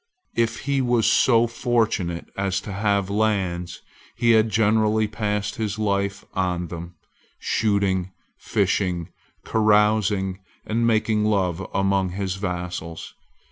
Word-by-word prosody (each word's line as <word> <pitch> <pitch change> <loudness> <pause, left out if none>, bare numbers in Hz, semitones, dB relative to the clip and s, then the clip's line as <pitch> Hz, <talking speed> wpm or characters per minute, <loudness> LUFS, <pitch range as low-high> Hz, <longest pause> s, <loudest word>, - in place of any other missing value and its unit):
If 115 -1 0
he 140 -1 0
was 120 -3 +2
so 115 +1 +4
fortunate 115 -8 -1
as 95 -1 0
to 100 - -7
have 100 -1 0
lands, 95 -5 -1 0.3
he 120 0 +3
had 110 0 +4
generally 110 0 +2
passed 105 -1 -2
his 105 -2 -2
life 100 -1 -1
on 90 -2 -1
them, 85 0 -8 0.4
shooting, 100 -4 0 0.3
fishing, 90 -2 0 0.4
carousing, 105 -3 +2 0.3
and 115 +2 0
making 110 -1 +2
love 95 -4 +1
among 95 -2 +1
his 95 -1 -3
vassals. 90 -3 -5
100 Hz, 115 wpm, -23 LUFS, 95-110 Hz, 0.4 s, so